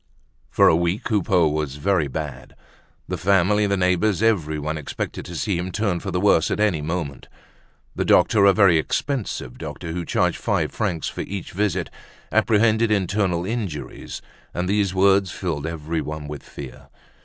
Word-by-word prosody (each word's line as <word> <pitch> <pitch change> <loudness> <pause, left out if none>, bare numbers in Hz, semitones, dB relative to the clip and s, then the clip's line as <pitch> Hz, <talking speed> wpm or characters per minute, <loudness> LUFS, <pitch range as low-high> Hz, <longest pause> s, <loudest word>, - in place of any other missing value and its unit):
For - - +4
a - - +6
week 85 +7 0
Coupeau 95 -6 +2
was 75 -2 -2
very 85 0 +1
bad. 70 -2 -6 0.5
The - - -3
family, 100 +3 +3
the 100 0 +1
neighbors, 90 +2 +2
everyone, 80 -8 0
expected 75 -2 -5
to 85 - -8
see 95 0 -1
him 90 +1 -4
turn 100 -3 0
for 95 - -5
the 90 -1 -1
worse 90 -5 +3
at - - -1
any 100 -8 +2
moment. 80 -2 -4 0.7
The - - 0
doctor—a 100 -2 +5
very 95 -5 +5
expensive 105 - -3
doctor, 85 -2 -6
who 85 +1 -3
charged - - +1
five - - 0
francs 80 -3 -2
for - - -4
each 100 -1 -6
visit—apprehended 105 +4 0
internal 95 -3 0
injuries, 100 -8 -5 0.3
and 90 +1 -1
these 100 -1 +1
words 95 0 +4
filled 80 -5 -3
everyone 75 -2 -4
with 75 -1 -6
fear. 70 -3 -10
90 Hz, 155 wpm, -23 LUFS, 80-100 Hz, 0.7 s, a